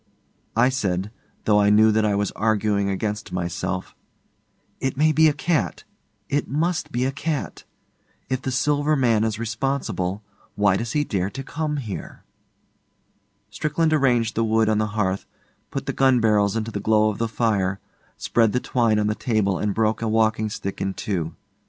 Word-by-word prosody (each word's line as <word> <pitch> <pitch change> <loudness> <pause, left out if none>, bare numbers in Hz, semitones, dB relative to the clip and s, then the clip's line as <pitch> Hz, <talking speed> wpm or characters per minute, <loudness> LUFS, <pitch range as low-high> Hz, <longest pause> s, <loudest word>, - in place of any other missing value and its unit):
I 120 +3 +4
said, 100 -6 -1 0.3
though 105 -1 +4
I 105 - +4
knew 110 +1 +6
that 110 +1 +2
I 105 -1 +2
was 100 0 0
arguing 105 -2 +1
against 105 +2 -3
myself, 90 +1 -3 0.9
'It 130 0 -2
may 155 +2 +4
be 160 +1 +5
a - - +4
cat. 150 - -1 0.4
It 145 - -1
must 165 +4 -1
be 125 +1 0
a 135 - 0
cat. 150 +2 -4 0.6
If 130 0 -2
the 130 - -3
Silver 145 +3 +1
Man 115 -6 +2
is 110 -1 -1
responsible, 110 -5 -2 0.3
why 100 -2 +3
does 115 +3 -3
he 150 - +2
dare 95 -8 -1
to 135 +5 -7
come 150 +1 -3
here?' 110 -8 -7 1.3
Strickland 155 +1 0
arranged 120 -6 +2
the 115 - 0
wood 110 0 +2
on 110 -1 +2
the 110 - +1
hearth, 95 -2 0 0.4
put - - -4
the - - -2
gun 130 -2 +4
barrels 105 -2 +2
into 115 0 -2
the 105 - -3
glow 110 0 +3
of 100 - -8
the 115 - +1
fire, 100 -4 0 0.4
spread 115 -3 +2
the 125 - +2
twine 115 -4 +1
on 105 - +1
the 105 - +1
table 105 -5 0
and 105 - 0
broke 110 0 +1
a 115 - -1
walking 110 0 +2
stick 100 -2 -5
in 95 0 -2
two. 85 -6 -3
110 Hz, 175 wpm, -23 LUFS, 105-130 Hz, 1.3 s, knew